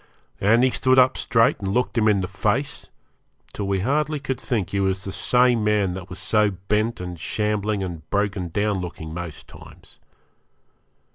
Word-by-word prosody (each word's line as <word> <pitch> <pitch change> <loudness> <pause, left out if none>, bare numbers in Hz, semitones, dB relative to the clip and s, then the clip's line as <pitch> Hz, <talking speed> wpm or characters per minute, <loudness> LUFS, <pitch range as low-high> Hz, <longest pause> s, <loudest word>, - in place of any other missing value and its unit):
And 115 +5 +4
he 130 - +4
stood 130 +1 +2
up 130 0 +5
straight 115 +4 +2
and 100 - -4
looked 125 +6 0
him 110 -2 +3
in 100 -2 +3
the 90 - -2
face, 110 +8 -2 0.6
till 100 - -4
we 100 -1 0
hardly 150 +6 0
could 130 -2 -4
think 110 -9 -2
he 100 - 0
was 95 -1 0
the 95 - -4
same 125 +3 +3
man 105 -3 +1
that 95 0 -8
was 90 - -7
so 105 -1 +2
bent 105 +4 -1
and 90 -2 -6
shambling 105 +2 -1
and 85 -4 -7
broken 100 -3 -1
down 100 +2 0
looking 80 -3 -7
most 85 -2 -7
times. - - -15
105 Hz, 180 wpm, -23 LUFS, 95-120 Hz, 0.6 s, up